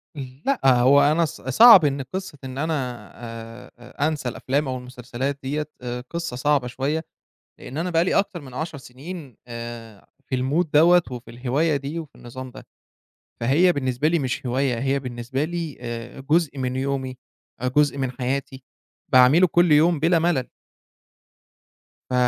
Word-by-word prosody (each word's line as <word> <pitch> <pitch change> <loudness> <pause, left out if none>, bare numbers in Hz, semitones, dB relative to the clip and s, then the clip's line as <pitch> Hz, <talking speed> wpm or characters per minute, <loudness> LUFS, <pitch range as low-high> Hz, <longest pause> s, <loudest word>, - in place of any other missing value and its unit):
لأ، 140 - -3
هو 130 +2 +6
أنا 155 +4 +3
ص 160 +1 -8
صعب 185 - +8
إن 140 -1 0
قصة 150 +4 -6
إن 130 0 -7
أنا 160 +3 -1 0.5
آآ، 120 +4 -6
أنسى 150 -5 -2
الأفلام 140 +4 -1
أو 130 -1 -2
المسلسلات 125 +2 -5
ديّة 150 +3 -3
آآ، 125 0 -4
قصة 170 -6 -4
صعبة 140 0 +1
شوية، 145 +6 -2 0.5
لإن 135 - -8
أنا 175 +3 -1
بقى 165 0 +3
لي 185 - 0
أكتر 190 -3 0
من 130 -4 -12
10 160 +1 -4
سنين 140 - -10
آآ، 115 -3 -8 0.2
في 130 - -2
الmood 140 +7 +1
دوّة 170 +4 +6
وفي 125 -1 -8
الهواية 135 +6 0
دي، 140 +4 -5
وفي 160 -4 -8
النظام 130 +2 -9
ده، - - -13 0.8
فهي 160 +10 +4
بالنسبة 130 0 0
لي 170 +1 +2
مش 135 0 -3
هواية، 125 -1 0
هي 135 +2 0
بالنسبة 125 +1 -4
لي 165 -2 -4
آآ، 120 0 -6
جزء 150 +1 +1
من 130 -1 -2
يومي 130 -1 -2 0.4
آآ، 125 - 0
جزء 145 +2 +2
من 130 -2 -1
حياتي 130 +1 -4 0.5
باعمله 130 +8 +7
كُلّ 175 0 +3
يوم 155 +2 +4
بِلا 165 +3 +3
ملل. 160 -7 0 1.6
ف - - -4
135 Hz, 160 wpm, -23 LUFS, 125-155 Hz, 1.6 s, صعب